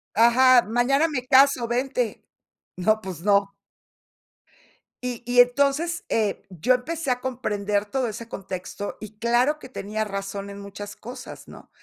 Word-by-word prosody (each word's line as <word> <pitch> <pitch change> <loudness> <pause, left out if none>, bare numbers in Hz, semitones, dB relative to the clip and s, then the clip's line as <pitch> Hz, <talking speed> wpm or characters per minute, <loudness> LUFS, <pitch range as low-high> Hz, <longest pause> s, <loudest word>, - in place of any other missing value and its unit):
Ajá, 245 +2 +6
"Mañana 260 +7 +2
me 255 -5 -3
caso, 265 -2 +5
vente", 245 -1 -1 0.5
no, 215 +4 +2
pues 185 -5 -7
no. 200 0 +3 1.6
Y 245 -2 -3
y 245 +1 +6
entonces, 280 +7 +1
eh, 215 -3 0
yo 185 +8 +2
empecé 300 +2 -3
a 250 - 0
comprender 210 -5 -2
todo 255 +3 -1
ese 230 +2 -7
contexto, 195 +1 -6
y 215 0 -10
claro 245 +6 +2
que - - -10
tenía 215 -3 -4
razón 200 0 -5
en 200 0 -9
muchas 200 +1 -8
cosas, 245 +3 -10
¿no?, - - -13
235 Hz, 140 wpm, -24 LUFS, 205-255 Hz, 1.6 s, Ajá